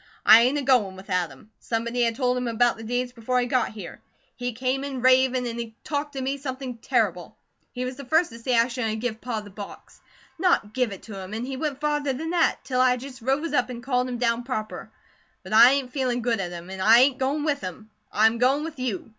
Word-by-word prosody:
"I 225 - +9
ain't 255 +5 +2
a 285 - -2
goin' 245 -8 +2
with 190 +1 -11
Adam. 180 +1 -3
Somebody 235 +1 -2
had 230 -1 +2
told 250 -1 +1
him 250 -1 -2
about 235 +1 +2
the 225 - -10
deeds 245 +2 -2
before 250 +1 -1
he 245 - +1
got 250 0 +1
here. 200 -6 -9 0.3
He 245 0 -3
came 255 +3 -1
in 270 -3 -4
ravin', 255 0 +4
and 235 -1 -4
he 225 -1 -6
talked 290 -1 -3
to 270 - -4
me 270 +2 -2
something 260 -3 -6
terrible. 215 -9 -1 0.3
He 250 0 -4
was 255 0 -5
the 280 - -8
first 320 +4 +2
to 230 - -10
say 245 +1 0
I 230 +1 +4
shouldn't 235 -3 -2
a - - -2
give 220 0 -4
Pa 230 -4 -3
the 205 -1 -12
box. 200 +1 -11 0.4
NOT 340 - +2
GIVE 250 -4 0
IT 195 - -9
TO 205 -3 -8
HIM! 190 +3 -7
An' 230 +2 -3
he 265 +1 -5
went 280 0 -3
farther 295 -2 0
than 320 +5 -4
that, 345 -2 +2
till 255 -1 0
I 250 -1 +4
just 255 0 -10
rose 275 +6 -1
up 250 -3 +1
an' 240 -1 -6
called 250 -1 0
him 245 - -3
down 235 -1 +1
proper; 225 -4 -5 0.5
but - - -7
I 240 +4 +8
ain't 270 -3 -2
feelin' 255 -3 -1
good 230 -2 0
at 185 -2 -2
him, 175 +1 -9
an' 190 0 -6
I 220 +4 +7
ain't 260 -1 +3
goin' 280 +3 0
with 290 -2 0
him. 215 +4 -8 0.2
I 215 - +3
am 225 +1 +3
goin' 270 +4 +3
with 320 -4 -7
you. 240 -7 -3
250 Hz, 250 wpm, -25 LUFS, 225-265 Hz, 0.5 s, I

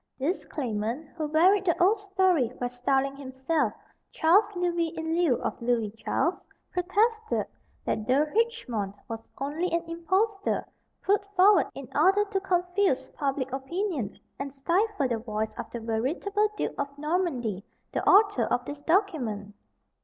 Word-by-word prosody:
This 305 +8 -1
claimant, 240 +2 -3
who 310 -3 -2
varied 365 +6 +4
the 340 0 +1
old 395 +4 +4
story 375 - +2
by 245 - -1
styling 270 +3 0
himself 265 -1 -1 0.4
Charles 365 +7 +4
Louis 345 -1 0
in 320 0 -3
lieu 340 -7 +3
of - - -3
Louis 235 -3 +1
Charles, 225 - -1 0.3
protested 435 +5 +1 0.4
that 215 - -2
De 275 +4 +4
Richemont 295 - -1
was 225 -1 -4 0.2
only 300 +6 -2
an 335 0 +1
impostor 380 +5 0 0.4
put 405 0 +2
forward 390 +3 +6
in - - -7
order 400 +2 +4
to 400 -1 -1
confuse 360 -4 +1
public 270 -2 -2
opinion, 275 - -3 0.2
and 275 0 -4
stifle 340 +4 +1
the 235 -2 -1
voice 220 -1 -3
of - - -6
the 235 - -5
veritable 290 - 0
Duke - - -1
of 280 0 -3
Normandy, 285 - -1 0.3
the - - -2
author 410 +1 +5
of 245 0 0
this 290 +1 -7
document! 285 - 0
320 Hz, 145 wpm, -27 LUFS, 255-380 Hz, 0.4 s, forward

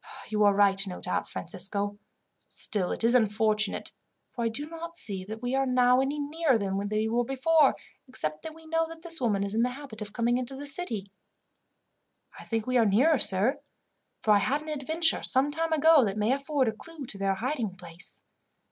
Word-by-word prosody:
"You 210 -1 +1
are 205 - +5
right, 195 -1 +3
no 180 - -6
doubt, 180 - -3
Francisco. 200 +4 -4 0.5
Still, 195 -4 -1
it - - -2
is 230 +1 +4
unfortunate, 215 -2 +1 0.4
for 240 - -5
I - - +2
do 245 +7 -5
not 335 +1 -8
see 195 -3 -3
that 220 +3 -8
we 245 +1 -2
are 270 0 +1
now 250 0 +4
any 275 +2 -1
nearer 295 -2 +1
than 195 -2 -2
we 215 +2 -1
were 235 +2 +1
before, 275 +4 +3 0.3
except 155 -12 -2
that 315 -1 -8
we 325 0 -15
know 325 0 0
that 330 0 -11
this 330 -4 +1
woman 205 -5 +1
is 200 0 -3
in 225 - +1
the 245 - +2
habit 250 -4 -9
of 205 -1 -5
coming 240 +2 +1
into 255 +1 -5
the 285 +2 -7
city." 240 - 0 1.3
"I - - -11
think 225 -2 -2
we 255 -1 +2
are 230 - +4
nearer, 260 +9 +4
sir, 210 +8 +3 0.6
for 215 - +3
I 205 - +6
had 285 +8 0
an 310 - -8
adventure 315 +3 +2
some 270 +2 +2
time 325 +2 -2
ago 315 -2 +5
that 205 -2 -2
may 210 +3 +1
afford 275 -1 0
a - - +2
clue 315 +5 -9
to 200 -4 -5
their 195 0 +1
hiding 235 -3 -3
place." 175 0 -7
245 Hz, 205 wpm, -28 LUFS, 205-290 Hz, 1.3 s, I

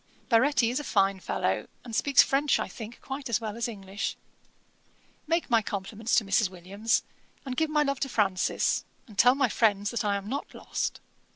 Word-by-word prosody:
Baretti 240 0 +4
is 255 - -1
a - - -5
fine 195 -6 +2
fellow, - - -1 0.2
and 230 -2 -6
speaks 280 +4 +5
French, 280 +2 +2
I - - -2
think, 230 +1 -9
quite 270 -1 -6
as 235 - +2
well 220 -2 -5
as 235 +1 -1
English. 200 -2 -5 1.1
'Make 330 +2 +1
my 230 -1 +5
compliments 210 +3 -2
to 220 - +3
Mrs. 195 +1 +2
Williams; 195 +5 -1 0.4
and 260 -2 -4
give 320 +3 +1
my 300 -1 +3
love 275 -2 -1
to 270 - -1
Francis; 195 -6 +1 0.2
and 215 - -15
tell 245 +6 +6
my 275 -2 +3
friends 205 -3 +2
that 235 -1 -1
I 205 -1 +1
am 200 0 -4
not 275 +6 -4
lost. - - -3
230 Hz, 190 wpm, -28 LUFS, 200-265 Hz, 1.1 s, tell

